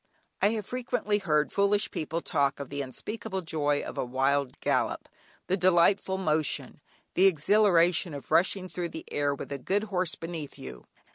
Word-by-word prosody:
I 200 Hz, -, +5 dB
have 215 Hz, -3 st, -3 dB
frequently 245 Hz, -4 st, -1 dB
heard 150 Hz, -6 st, +1 dB
foolish 200 Hz, +1 st, +2 dB
people 160 Hz, +2 st, -3 dB
talk 140 Hz, -2 st, 0 dB
of 140 Hz, -1 st, -7 dB
the 140 Hz, 0 st, -2 dB
unspeakable 190 Hz, -, -5 dB
joy 145 Hz, -3 st, 0 dB
of -, -, -6 dB
a -, -, +1 dB
wild 135 Hz, +1 st, 0 dB
gallop, -, -, 0 dB, 0.4 s
the 185 Hz, -, +1 dB
delightful 185 Hz, +1 st, +3 dB
motion, 155 Hz, -5 st, -1 dB, 0.3 s
the 190 Hz, +2 st, +5 dB
exhilaration 175 Hz, -2 st, +3 dB
of 140 Hz, -, -10 dB
rushing 185 Hz, +1 st, +2 dB
through 175 Hz, -1 st, -4 dB
the 160 Hz, -, -8 dB
air, 145 Hz, -1 st, 0 dB
with 140 Hz, -, -8 dB
a 140 Hz, -, -3 dB
good 200 Hz, +10 st, 0 dB
horse 180 Hz, -2 st, +1 dB
beneath 165 Hz, -3 st, -7 dB
you. 65 Hz, -2 st, -10 dB
170 Hz, 165 wpm, -28 LUFS, 145-195 Hz, 0.4 s, I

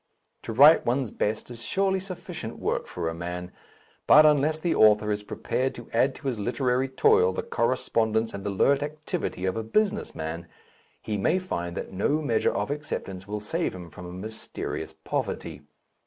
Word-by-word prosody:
To -, -, -6 dB
write 145 Hz, +8 st, +7 dB
one's 125 Hz, -1 st, 0 dB
best 110 Hz, +3 st, -2 dB
is 120 Hz, -1 st, -8 dB
surely 190 Hz, +4 st, +1 dB
sufficient 185 Hz, -1 st, -7 dB
work -, -, -2 dB
for -, -, -4 dB
a 80 Hz, -, -2 dB
man, 90 Hz, +2 st, -5 dB, 0.6 s
but 155 Hz, +1 st, +8 dB
unless 150 Hz, +1 st, +3 dB
the 170 Hz, +1 st, 0 dB
author 105 Hz, 0 st, +5 dB
is 105 Hz, 0 st, -1 dB
prepared 130 Hz, +5 st, -2 dB
to 120 Hz, -, -10 dB
add 130 Hz, +4 st, +2 dB
to 145 Hz, -, -7 dB
his 120 Hz, -5 st, -1 dB
literary 125 Hz, +4 st, 0 dB
toil 95 Hz, -8 st, +4 dB
the -, -, -3 dB
correspondence 115 Hz, -2 st, 0 dB
and 100 Hz, -1 st, -6 dB
alert 135 Hz, +8 st, +3 dB
activity 150 Hz, -, -3 dB
of 95 Hz, -, 0 dB
a 110 Hz, -, -1 dB
business 215 Hz, -, 0 dB
man, 80 Hz, +2 st, -5 dB, 0.6 s
he 105 Hz, -2 st, -2 dB
may 140 Hz, -, +2 dB
find 85 Hz, -, -4 dB
that -, -, -5 dB
no 140 Hz, +11 st, +1 dB
measure 120 Hz, -8 st, +1 dB
of 105 Hz, +7 st, -2 dB
acceptance 100 Hz, -10 st, -5 dB
will 105 Hz, +1 st, -3 dB
save 165 Hz, -, -2 dB
him 90 Hz, -2 st, -9 dB
from 90 Hz, 0 st, -9 dB
a -, -, -8 dB
mysterious 90 Hz, -6 st, -5 dB
poverty. -, -, -4 dB
115 Hz, 175 wpm, -26 LUFS, 95-145 Hz, 0.6 s, but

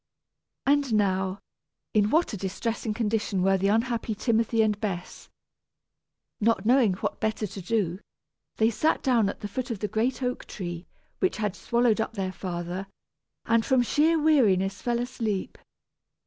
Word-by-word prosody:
And 280 Hz, -4 st, +2 dB
now, 190 Hz, -1 st, 0 dB, 0.5 s
in 210 Hz, -1 st, +3 dB
what 320 Hz, 0 st, +2 dB
a -, -, -1 dB
distressing 215 Hz, +4 st, -3 dB
condition 210 Hz, -4 st, 0 dB
were 195 Hz, 0 st, +4 dB
the 195 Hz, -, +1 dB
unhappy 225 Hz, +1 st, 0 dB
Timothy 225 Hz, 0 st, +2 dB
and 210 Hz, -1 st, 0 dB
Bess! 185 Hz, -5 st, -5 dB, 1.1 s
Not 220 Hz, -2 st, +2 dB
knowing 240 Hz, -4 st, +4 dB
what -, -, -3 dB
better 220 Hz, 0 st, -1 dB
to 195 Hz, 0 st, -7 dB
do, 185 Hz, -2 st, -1 dB, 0.6 s
they 220 Hz, +1 st, +3 dB
sat 310 Hz, +8 st, +1 dB
down 235 Hz, -6 st, +3 dB
at -, -, -7 dB
the 205 Hz, -, -3 dB
foot 255 Hz, +5 st, -4 dB
of 230 Hz, -, -2 dB
the 210 Hz, -, -2 dB
great 245 Hz, +5 st, -1 dB
oak 250 Hz, 0 st, -2 dB
tree 175 Hz, -3 st, -6 dB, 0.3 s
which 375 Hz, -, +1 dB
had 210 Hz, -3 st, -1 dB
swallowed 235 Hz, -1 st, +2 dB
up 225 Hz, -, -3 dB
their 190 Hz, -3 st, -3 dB
father, 180 Hz, +1 st, -4 dB, 0.6 s
and 230 Hz, 0 st, +3 dB
from 260 Hz, 0 st, +3 dB
sheer 315 Hz, +6 st, +3 dB
weariness 200 Hz, -11 st, +3 dB
fell 240 Hz, -1 st, 0 dB
asleep. 225 Hz, -5 st, -3 dB
220 Hz, 155 wpm, -27 LUFS, 195-240 Hz, 1.1 s, were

